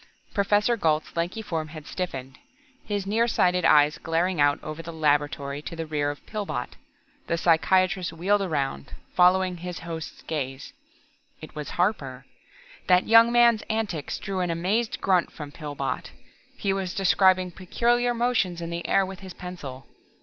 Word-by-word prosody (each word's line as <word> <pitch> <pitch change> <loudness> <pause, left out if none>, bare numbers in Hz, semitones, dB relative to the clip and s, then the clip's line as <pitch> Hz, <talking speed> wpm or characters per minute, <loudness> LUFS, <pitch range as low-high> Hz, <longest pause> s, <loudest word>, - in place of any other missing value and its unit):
Professor 205 +3 +2
Gault's 160 -7 0
lanky 175 +6 -2
form 160 -6 -3
had 155 -1 -10
stiffened, 135 -9 -5 0.4
his 205 -2 -3
near 225 +4 +2
sighted 180 -5 +2
eyes 150 -1 +5
glaring 165 0 0
out 145 0 +4
over 155 +1 -6
the 165 +1 -8
laboratory 145 -2 0
to 165 - -7
the 165 0 -4
rear 150 -2 -1
of 145 - -7
Pillbot. 205 - -4 0.6
The 170 - 0
psychiatrist 180 +2 +2
wheeled 190 +5 +1
around, 140 - -2 0.2
followed 180 0 +3
his 180 0 -6
host's 165 -2 -7
gaze. 135 -3 -4 0.7
It 155 - -11
was 150 -1 -6
Harper. 160 -9 -1 0.6
That 180 -1 +5
young 230 +1 +7
man's 235 -2 +5
antics 210 -9 -2
drew 195 -2 -4
an 180 -1 0
amazed 190 +8 0
grunt 185 -3 +2
from 150 -2 -8
Pillbot. 145 -3 -4 0.5
He 195 -1 0
was 190 -2 -3
describing 185 -1 +3
peculiar 240 +7 +1
motions 230 -8 +1
in 170 0 -5
the 170 0 -4
air 195 - +3
with 190 0 -8
his 190 -2 -10
pencil. 140 -8 -8
175 Hz, 155 wpm, -26 LUFS, 155-195 Hz, 0.7 s, young